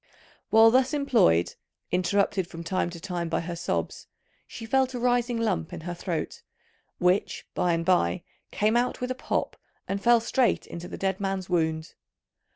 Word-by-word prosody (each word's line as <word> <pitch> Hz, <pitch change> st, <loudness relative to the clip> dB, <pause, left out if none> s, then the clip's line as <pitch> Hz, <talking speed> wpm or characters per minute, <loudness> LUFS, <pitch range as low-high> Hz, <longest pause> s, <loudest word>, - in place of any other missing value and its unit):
While 225 Hz, +1 st, +7 dB
thus 260 Hz, +3 st, +3 dB
employed, 160 Hz, -, +3 dB, 0.4 s
interrupted 190 Hz, 0 st, +1 dB
from 170 Hz, -1 st, -8 dB
time 180 Hz, +1 st, -1 dB
to 170 Hz, -1 st, -9 dB
time 175 Hz, -1 st, -4 dB
by 165 Hz, -, 0 dB
her 170 Hz, +1 st, -5 dB
sobs, 170 Hz, -, -3 dB, 0.4 s
she 230 Hz, -, -8 dB
felt 260 Hz, +2 st, +1 dB
a -, -, -3 dB
rising 245 Hz, 0 st, +1 dB
lump 210 Hz, -8 st, -1 dB
in 175 Hz, -, -6 dB
her 175 Hz, +2 st, -5 dB
throat, 170 Hz, -1 st, -4 dB, 0.6 s
which 180 Hz, +2 st, +1 dB
by 175 Hz, -1 st, +1 dB
and 165 Hz, 0 st, -1 dB
by 90 Hz, -, +2 dB, 0.3 s
came 215 Hz, +2 st, +1 dB
out 245 Hz, +1 st, +1 dB
with 250 Hz, 0 st, -3 dB
a -, -, +1 dB
pop 255 Hz, -, -2 dB, 0.3 s
and 195 Hz, 0 st, -2 dB
fell 235 Hz, +2 st, +5 dB
straight 245 Hz, +2 st, +1 dB
into 170 Hz, +1 st, -8 dB
the -, -, -7 dB
dead 190 Hz, -1 st, -1 dB
man's 195 Hz, -2 st, -3 dB
wound. 160 Hz, -2 st, 0 dB
190 Hz, 170 wpm, -26 LUFS, 170-235 Hz, 0.6 s, While